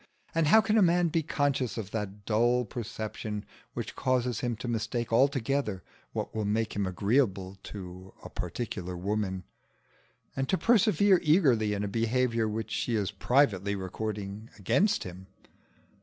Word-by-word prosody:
And 165 -2 +2
how 220 +8 +7
can 220 0 +2
a - - +5
man 175 -1 +4
be 165 +1 +1
conscious 140 -7 0
of 105 -3 -5
that 105 -2 -5
dull 120 +3 +2
perception 110 -1 -5 0.3
which - - -5
causes 125 -3 0
him 120 -2 -1
to 120 +3 -6
mistake 115 0 -2
altogether 135 -4 +1 0.3
what - - -4
will 110 - -1
make 110 +2 0
him 100 -2 0
agreeable 100 -1 0
to 95 -1 -9
a - - -8
particular 90 -2 -4
woman, 95 0 -2 0.9
and 135 0 -2
to 190 - +3
persevere 205 -4 +4
eagerly 135 - +3
in 100 - -2
a - - -1
behaviour 115 +2 +1
which 110 +1 -4
she 120 - -1
is 100 -3 0
privately 100 -3 +2
recording 105 +2 -5
against 130 - +2
him? 90 +1 -9
110 Hz, 150 wpm, -29 LUFS, 100-135 Hz, 0.9 s, how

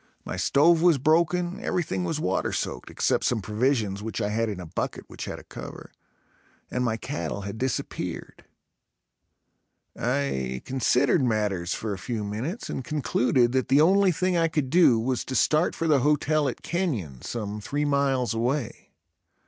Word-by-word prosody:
My - - -4
stove 160 +3 +4
was 170 -4 +5
broken, 170 +5 +2
everything 120 - -1
was 90 - -2
water - - 0
soaked, - - -3
except - - 0
some 120 - +1
provisions 105 -1 0
which 110 0 -4
I 105 - 0
had 115 +1 0
in 100 -3 -5
a 90 - -7
bucket 80 - -4
which - - -7
had - - -5
a - - -12
cover - - -9 0.8
and 125 - -1
my 115 -2 0
cattle 130 -6 -4
had 100 +2 -6
disappeared. 130 0 -4 1.5
I 65 - -1
considered 130 +3 +2
matters 105 -7 0
for 110 -2 -3
a 95 - -6
few 115 -1 -3
minutes 115 - -4
and 135 - -4
concluded 125 -2 +1
that 130 -1 0
the 140 +2 +5
only 190 +3 +5
thing 185 +2 0
I 165 -1 +3
could 150 -5 -2
do 160 -9 +5
was 125 +2 -1
to 130 - -4
start 155 +5 +2
for 165 - -2
the 150 -4 +4
hotel 150 +1 +2
at 120 - -8
Kenyon, 120 - -2
some 105 -2 -4
three 145 +7 -2
miles 135 -5 +1
away. 120 +3 -2
130 Hz, 165 wpm, -26 LUFS, 110-150 Hz, 1.5 s, was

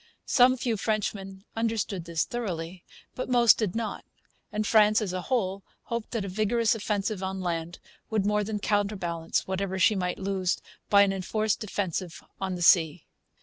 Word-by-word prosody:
Some 255 0 +5
few 235 -3 -1
Frenchmen 195 -2 -3
understood 220 -5 -1
this 170 -1 0
thoroughly. 180 -7 -5 0.3
But 255 - -5
most 240 -2 +6
did 215 -4 -1
not. 230 -1 -3 0.5
And 215 0 -1
France, 215 0 +5
as 200 -5 -3
a 185 - -2
whole, 200 -5 -1 0.2
hoped 235 -2 -4
that 225 -5 -2
a - - -4
vigorous 215 +4 +1
offensive 210 -2 -2
on 190 0 -3
land 170 -1 -3 0.3
would 215 -3 0
more 210 0 +2
than 210 +1 -3
counterbalance 200 -6 -1
whatever 190 0 -2
she 190 +4 +5
might 180 -3 -2
lose 190 -1 -1 0.3
by 200 -1 +7
an 195 -1 +1
enforced 215 +3 -1
defensive 190 -4 -3 0.2
on 190 -1 -2
the 175 - -3
sea. 165 -1 +4
200 Hz, 165 wpm, -27 LUFS, 185-215 Hz, 0.5 s, by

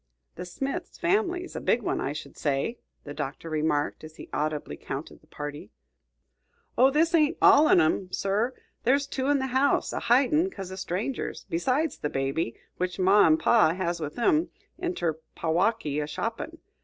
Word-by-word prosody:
"The 180 - -7
Smith 275 - -5
family's 360 -1 0
a - - -4
big 235 - +1
one, - - -1
I 135 - -1
should 145 -1 -8
say," 145 - -1 0.2
the 145 - -7
Doctor 145 +4 -5
remarked, 150 -1 0
as 155 0 -10
he - - -11
audibly 150 0 -2
counted 135 +3 -7
the - - -26
party. 145 -6 -7 1.1
"Oh, 260 +2 +6
this 320 +5 +2
ain't 305 -3 +3
all 300 +2 +7
on 180 - +6
'em, 175 +3 +1
sir; 210 +7 0 0.3
there's 275 +3 +3
two 265 -1 -3
in 290 0 +4
the 265 - -1
house, 275 +2 +2
a - - -1
hidin' 280 +9 +3
'cause 190 - -8
o' - - -5
strangers, 190 +7 -4
besides 260 - 0
the 150 - -2
baby, 135 -1 -2 0.2
which 180 0 -2
ma 190 +1 +5
and 155 0 +4
pa 200 -8 +4
has 175 -2 -2
with 150 -2 -5
'em 305 +8 +2 0.3
inter 175 - -2 0.2
Packwaukee, 165 -2 0
a 145 - -3
shoppin'. 230 - -4
195 Hz, 175 wpm, -27 LUFS, -, 1.1 s, all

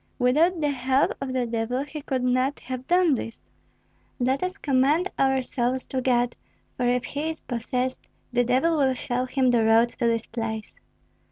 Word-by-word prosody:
Without 310 +8 +3
the 295 -1 +1
help 260 0 +1
of 270 -1 -3
the 255 -1 0
devil 235 +3 -2
he 295 +1 -7
could 260 -2 -2
not 255 +3 +1
have 255 0 -6
done 355 -3 +4
this." 230 -3 -5 0.8
"Let 260 +2 +1
us 365 +1 -2
commend 290 +7 +2
our 265 -1 +2
souls 250 +1 -1
to 260 - -1
God; 245 -1 +1 0.4
for 245 - 0
if 250 0 +1
he 290 +5 -3
is 320 - -6
possessed, 250 +2 -3 0.3
the 245 0 +3
devil 265 +7 +2
will 265 -2 +2
show 250 0 -2
him 255 -1 +2
the 235 -2 +3
road 225 +2 +5
to - - -19
this 230 -1 0
place." 225 -2 -5
255 Hz, 180 wpm, -25 LUFS, 245-275 Hz, 0.8 s, road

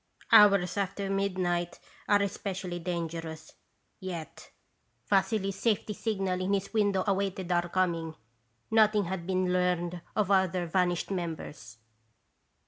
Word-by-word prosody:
" - - -25
Hours 200 -3 +6
after 195 0 -2
midnight 185 -3 -1 0.3
are 205 -1 +4
especially 190 -3 -4
danger 170 -1 -3
ous, 160 0 -11 0.5
yet 175 -5 -7 0.6
Vassily's 195 0 +1
safety 215 -2 0
signal 195 -4 -2
in 190 +2 0
his 195 +2 -4
window 205 -3 +2
awaited 195 -2 -1
our 175 0 +1
coming. 170 -3 -1 0.6
Nothing 215 -2 +4
had 180 -1 -4
been 185 -1 +1
learned 180 -1 0
of 205 -2 +1
other 185 -2 +2
vanished 175 +1 0
members. 160 - -5
185 Hz, 125 wpm, -29 LUFS, 175-200 Hz, 0.6 s, Hours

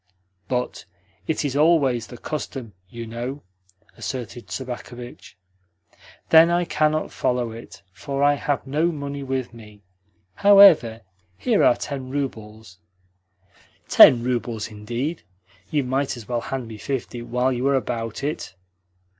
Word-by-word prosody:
"But 125 -1 -3 0.4
it 155 -1 -1
is 140 -1 -2
always 145 -6 +3
the 120 - -10
custom, 130 -5 -6 0.2
you 115 +2 -7
know," 120 +4 -6 0.5
asserted 120 -2 -6
Sobakevitch. 125 -4 -8 0.9
"Then 165 +1 +7
I 175 +1 +1
cannot 155 -1 0
follow 125 -2 -1
it, 110 -3 -11
for 140 +5 -3
I 145 0 +5
have 145 -1 -2
no 155 +6 +1
money 140 -2 -5
with 130 -3 -3
me. 105 -3 -14 0.5
However, 180 - +6 0.4
here 100 - +2
are - - +5
ten 135 -2 -6
roubles." 110 -8 -6 1.1
"Ten 120 -2 +8
roubles, 120 -3 -2
indeed? 120 +10 -4 0.5
You 145 -2 0
might 130 +1 -1
as 115 - -11
well 120 -1 -1
hand 130 -2 -5
me 110 -1 -9
fifty 125 -1 -4
while 125 +2 0
you 125 +2 -1
are 140 - +3
about 115 -2 -3
it." 145 -9 -4
125 Hz, 130 wpm, -23 LUFS, 115-145 Hz, 1.1 s, Ten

